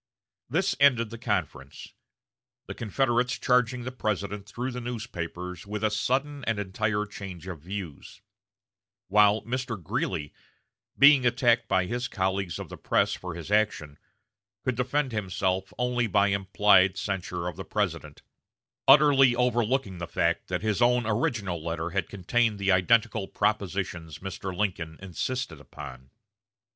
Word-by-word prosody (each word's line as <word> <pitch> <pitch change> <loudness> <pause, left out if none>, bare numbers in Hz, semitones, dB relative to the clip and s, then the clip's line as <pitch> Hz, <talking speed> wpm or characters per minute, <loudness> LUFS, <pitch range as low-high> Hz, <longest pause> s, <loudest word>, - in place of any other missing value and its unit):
This - - +1
ended 120 -5 +4
the 115 - -8
conference; 90 - -4 0.7
the - - -6
Confederates 120 +2 0
charging 125 -1 +2
the 125 - -4
President 105 -4 -3
through 125 +5 -4
the 125 0 -5
newspapers 90 -7 -6
with 105 +1 -4
a 110 - +2
"sudden 135 +6 -1
and 115 -2 0
entire 105 +1 -1
change 95 -4 -9
of 90 -4 -6
views"; 90 -2 -7 0.9
while 105 +1 +4
Mr. 125 -2 -3
Greeley, 75 -2 -3 0.6
being 140 -1 +7
attacked 120 -1 +3
by 95 0 +2
his 120 +5 -2
colleagues 95 -5 -1
of - - -6
the - - -8
press - - +1
for 90 -2 -6
his 85 +3 -8
action, 105 -9 0 0.6
could 130 - 0
defend 130 +3 0
himself 95 -2 -1
only 125 -1 0
by 100 0 +3
implied 100 0 +4
censure 90 -3 -3
of 90 - -4
the 95 - -6
President, 85 -9 -3 0.6
utterly 135 -3 +7
overlooking 120 -4 0
the 85 - -4
fact 85 +1 0
that 90 +2 -3
his 110 +1 0
own 120 0 +4
original 105 - -1
letter 85 0 -3
had 95 +2 -1
contained 105 +3 0
the 100 0 +1
identical 110 +2 +2
propositions 90 -6 -2
Mr. 95 +2 -6
Lincoln 85 -6 -2
insisted 95 - -4
upon. 65 -2 -10
105 Hz, 140 wpm, -27 LUFS, 90-120 Hz, 0.9 s, being